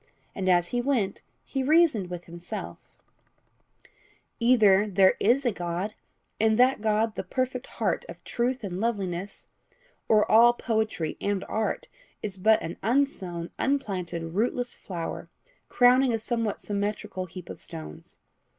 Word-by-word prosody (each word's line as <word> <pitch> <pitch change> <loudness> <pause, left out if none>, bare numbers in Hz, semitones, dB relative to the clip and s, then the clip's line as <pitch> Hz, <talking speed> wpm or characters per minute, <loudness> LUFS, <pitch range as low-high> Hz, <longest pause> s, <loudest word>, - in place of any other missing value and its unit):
And 190 -1 -1
as 175 -1 +3
he 245 - 0
went 240 -7 0 0.2
he 270 - -2
reasoned 285 - +3
with 175 -1 -6
himself 170 +1 -8 1.4
"Either 215 -4 +5
there 190 -1 +5
is 255 +6 +3
a 240 - +3
God, 175 +2 -3 0.5
and 220 0 +3
that 255 -1 +4
God 215 0 +1
the - - -3
perfect 255 -1 -2
heart - - 0
of - - -10
truth 245 +1 -1
and 185 -2 -4
loveliness, 195 -4 -3 0.6
or 215 -1 +5
all 235 +2 +6
poetry 220 -9 -2
and 200 -1 -1
art 355 - -2 0.4
is 200 -2 -5
but 220 +3 +5
an 170 - -5
unsown, 195 -9 -1
unplanted, 180 -11 -2
rootless 245 +4 0
flower, 170 -4 -6 0.4
crowning 250 +1 +5
a - - +2
somewhat 225 -1 -2
symmetrical 200 -2 -3
heap 180 0 -10
of - - -9
stones. 75 -1 -9
215 Hz, 135 wpm, -27 LUFS, 185-245 Hz, 1.4 s, all